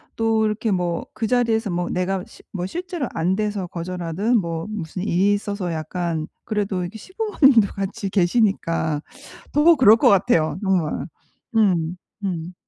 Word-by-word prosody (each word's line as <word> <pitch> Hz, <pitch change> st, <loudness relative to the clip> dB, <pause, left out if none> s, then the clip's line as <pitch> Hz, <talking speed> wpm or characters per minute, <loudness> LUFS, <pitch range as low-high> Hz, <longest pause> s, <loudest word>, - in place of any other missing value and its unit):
또 225 Hz, -1 st, +2 dB
이렇게 215 Hz, 0 st, -1 dB
뭐 175 Hz, -2 st, -1 dB
그 220 Hz, 0 st, -1 dB
자리에서 230 Hz, -3 st, +1 dB
뭐 175 Hz, 0 st, -2 dB
내가 185 Hz, +1 st, -1 dB
시 -, -, -17 dB
뭐 180 Hz, -2 st, -3 dB
실제로 350 Hz, -, -4 dB
안 175 Hz, +3 st, +1 dB
돼서 205 Hz, -3 st, -2 dB
거절하든 180 Hz, +6 st, -1 dB
뭐 165 Hz, +1 st, -4 dB
무슨 180 Hz, -4 st, -5 dB
일이 200 Hz, +1 st, +2 dB
있어서 200 Hz, -3 st, -3 dB
약간 160 Hz, 0 st, -3 dB, 0.2 s
그래도 205 Hz, -4 st, -1 dB
이렇게 180 Hz, +5 st, -5 dB
시부모님도 290 Hz, -, +3 dB
같이 195 Hz, +1 st, -3 dB
계시니까 175 Hz, -6 st, +1 dB, 0.5 s
더 320 Hz, +3 st, +6 dB
그럴 230 Hz, -6 st, +7 dB
것 -, -, +3 dB
같아요 190 Hz, -6 st, +3 dB
정말. 185 Hz, -6 st, 0 dB, 0.5 s
음 180 Hz, -5 st, +2 dB, 0.3 s
음. 175 Hz, -2 st, -3 dB
195 Hz, 300 characters per minute, -22 LUFS, 175-220 Hz, 0.5 s, 그럴